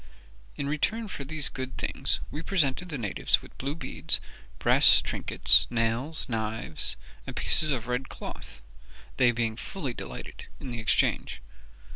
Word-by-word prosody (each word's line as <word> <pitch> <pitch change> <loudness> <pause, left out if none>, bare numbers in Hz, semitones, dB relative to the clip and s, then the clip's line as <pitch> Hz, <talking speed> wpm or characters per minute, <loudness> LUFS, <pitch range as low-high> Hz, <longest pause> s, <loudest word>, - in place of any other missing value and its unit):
In 140 - -3
return 220 +10 -1
for 140 - -5
these 150 +1 -2
good 130 0 -6
things - - -1
we 150 - -5
presented 170 -1 0
the 150 - -3
natives 105 -6 +1
with - - -15
blue 140 +3 -2
beads, 165 - 0 0.4
brass - - +7
trinkets, - - +4
nails, 120 +6 0
knives, 110 -7 -2 0.3
and - - -6
pieces 155 - +4
of 125 -5 -1
red 125 +1 -2
cloth, 65 +1 -9 0.6
they 125 -2 +5
being 115 -2 -1
fully 140 - -5
delighted - - -8
in 130 - -6
the 120 - -4
exchange. 110 -1 +1
130 Hz, 145 wpm, -28 LUFS, 115-150 Hz, 0.6 s, brass